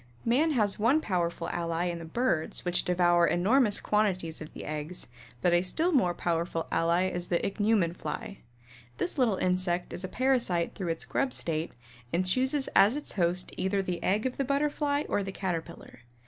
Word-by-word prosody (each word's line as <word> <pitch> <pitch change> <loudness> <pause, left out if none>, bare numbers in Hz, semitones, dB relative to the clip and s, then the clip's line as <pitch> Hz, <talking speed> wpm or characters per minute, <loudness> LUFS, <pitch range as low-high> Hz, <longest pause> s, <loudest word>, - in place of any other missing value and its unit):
Man 290 +7 +3
has 210 -6 +2
one 240 +8 +4
powerful 175 - -2
ally 170 0 -2
in 170 -1 -2
the 165 - -8
birds 170 -3 -1
which 175 0 +1
devour 175 -1 +3
enormous 210 +4 +3
quantities 185 -7 0
of 155 - -8
these - - -9
eggs, 155 +3 -2 0.4
but 175 - +4
a 175 - +4
still 320 - +1
more 185 - +2
powerful 165 -1 -1
ally 170 +3 +2
is 175 -1 -4
the 175 - +1
Ichneumon 205 -4 +1
Fly. 195 - -6 0.6
This 330 - -2
little 225 -7 +3
insect 180 -1 0
is 180 - -5
a - - -2
parasite 240 -8 0
through 190 -4 -5
its 165 -1 -2
grub 275 -2 -1
state 160 0 -2 0.4
and 185 +2 +1
chooses 260 +8 +1
as 215 +8 +5
its 295 - -6
host 180 -1 0
either 195 +1 0
the 180 -2 -3
egg 205 +6 +1
of 255 - -2
the 275 - +1
Butterfly 285 +1 0
or - - 0
the 195 0 -4
Caterpillar. 170 -7 -5
185 Hz, 180 wpm, -29 LUFS, 170-235 Hz, 0.6 s, as